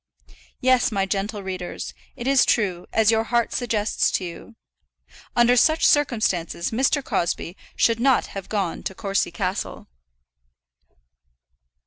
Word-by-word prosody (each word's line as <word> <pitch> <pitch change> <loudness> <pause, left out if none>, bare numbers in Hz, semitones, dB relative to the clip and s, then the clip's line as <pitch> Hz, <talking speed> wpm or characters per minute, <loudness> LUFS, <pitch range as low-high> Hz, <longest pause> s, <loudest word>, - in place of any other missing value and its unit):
Yes, 255 -1 +3
my 195 -2 0
gentle 200 +1 -3
readers; 185 -2 -5 0.2
it 240 - -7
is 270 0 +4
true, 185 -6 0
as 220 0 +4
your 225 0 +1
heart 235 0 0
suggests 220 -4 0
to 185 - -1
you. 175 +7 -10 0.8
Under 240 +1 +5
such 315 +6 +4
circumstances 215 - +1
Mr. 265 +4 +1
Crosbie 175 -4 -2 0.2
should 230 -1 +2
not 260 +1 +3
have 195 -2 -8
gone 195 -6 -2
to 190 - -5
Courcy 200 +1 -1
Castle. 185 +3 -4
215 Hz, 125 wpm, -23 LUFS, 190-240 Hz, 0.8 s, Under